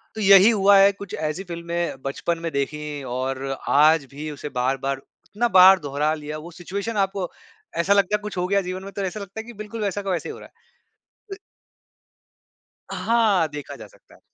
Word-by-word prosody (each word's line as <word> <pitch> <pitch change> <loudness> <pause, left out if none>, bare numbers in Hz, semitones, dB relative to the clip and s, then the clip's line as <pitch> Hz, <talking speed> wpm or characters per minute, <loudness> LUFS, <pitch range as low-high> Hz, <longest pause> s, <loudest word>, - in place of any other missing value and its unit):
तो 220 - -4
यही 195 +2 +8
हुआ 200 -2 +5
है 195 +1 +7
कुछ 200 -1 -10 0.2
ऐसी 180 +6 -5
फ़िल्में 170 -4 -4
बचपन 165 +5 -2
में 165 - -2
देखी 145 +1 -3
और 130 +2 -3 0.2
आज 150 0 +5
भी 150 +2 -6
उसे 145 0 -7
बार-बार 135 +1 -1 0.2
इतना 235 +3 -1
बार 190 +1 +9
दोहरा 145 +1 -1
लिया 150 0 -6
वो 170 +3 -10
सिचुएशन 195 +6 -5
है, 200 - +3
आपको 195 -2 -2 0.5
ऐसा 190 +4 +3
लगता 200 +1 +2
है 210 - -3
कुछ 210 -3 -7
हो 180 - 0
गया 200 +1 +2
जीवन 185 +1 -5
में 200 - -8
तो 200 - -4
ऐसा 190 +2 -3
लगता 200 +2 -8
है - - -5
कि 240 - -9
बिल्कुल 215 +1 -7
वैसा 205 0 -2
का 195 - -5
वैसा 175 - -2
ही - - -5
हो - - -11
रहा - - -12 0.6
है। 395 -4 -12
अ - - -22 1.5
हाँ, 215 -8 +2
देखा 145 -1 -8
जा - - -11
सकता - - -22
है। - - -21
180 Hz, 210 wpm, -23 LUFS, 150-200 Hz, 1.5 s, बार